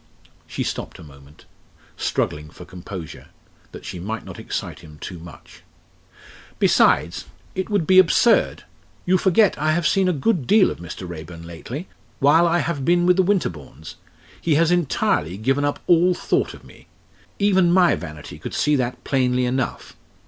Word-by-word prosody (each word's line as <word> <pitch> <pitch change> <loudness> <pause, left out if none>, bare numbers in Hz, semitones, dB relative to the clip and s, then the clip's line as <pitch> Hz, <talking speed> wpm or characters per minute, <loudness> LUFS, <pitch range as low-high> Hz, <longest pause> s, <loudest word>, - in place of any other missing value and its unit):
She - - -4
stopped - - -5
a - - -12
moment 70 -1 -17 0.5
struggling 75 0 -2
for 90 +3 -13
composure 90 -2 -9 0.4
that - - -11
she 90 - -6
might 110 +5 -5
not - - -10
excite - - -5
him 75 -2 -14
too 90 +4 -8
much. 80 -3 -14 1.0
"Besides, 85 +3 +2 0.3
it 190 +2 -4
would 200 -6 0
be 185 +2 +6
absurd! 185 +6 +3 0.4
You 185 +1 +3
forget 190 0 +3
I 155 +1 +1
have 170 0 -1
seen 190 +2 +2
a - - +3
good 165 - 0
deal 210 -1 +5
of - - -8
Mr. 85 +2 -8
Raeburn 85 0 -9
lately 115 - -8 0.3
while 160 +5 +4
I 170 +1 +2
have 170 -5 -2
been 175 +3 +2
with 180 0 +4
the - - +5
Winterbournes. 85 - -3 0.5
He 160 -3 +1
has 165 +2 +3
entirely 130 - 0
given 135 +6 0
up 145 0 -1
all 175 +1 +4
thought - - -1
of - - -16
me. - - -17 0.5
Even 190 -4 +3
my 180 -1 +4
vanity 75 -4 -8
could - - -7
see 150 - +2
that 125 -1 -3
plainly 125 -2 +1
enough. 130 +1 -3
140 Hz, 165 wpm, -22 LUFS, -, 1.0 s, be